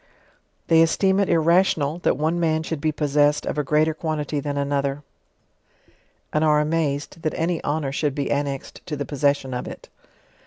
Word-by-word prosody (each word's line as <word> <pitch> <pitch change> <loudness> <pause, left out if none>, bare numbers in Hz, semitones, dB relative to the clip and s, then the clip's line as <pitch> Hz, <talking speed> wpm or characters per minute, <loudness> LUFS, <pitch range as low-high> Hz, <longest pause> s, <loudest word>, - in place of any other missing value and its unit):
They 165 0 +5
esteem 190 +4 +3
it 200 - +1
irrational, 165 -2 +2
that 175 - +1
one 160 +3 0
man 160 -1 +1
should 160 -2 -4
be 155 - +1
poss 150 -1 -3
essed 150 0 +3
of - - -2
a - - +1
greater 155 +2 +2
quantity 155 -2 -3
than 145 0 -3
another, 140 0 -1 1.3
and 155 - +2
are 150 -1 +4
amazed 150 0 -1
that 155 - -2
any 165 0 -1
honour 145 -2 -1
should 145 0 -1
be 140 -2 -2
annexed 140 -1 -3
to 155 - -3
the 145 0 -4
possession 140 -2 0
of 125 - -4
it. - - -10
150 Hz, 180 wpm, -23 LUFS, 145-160 Hz, 1.3 s, They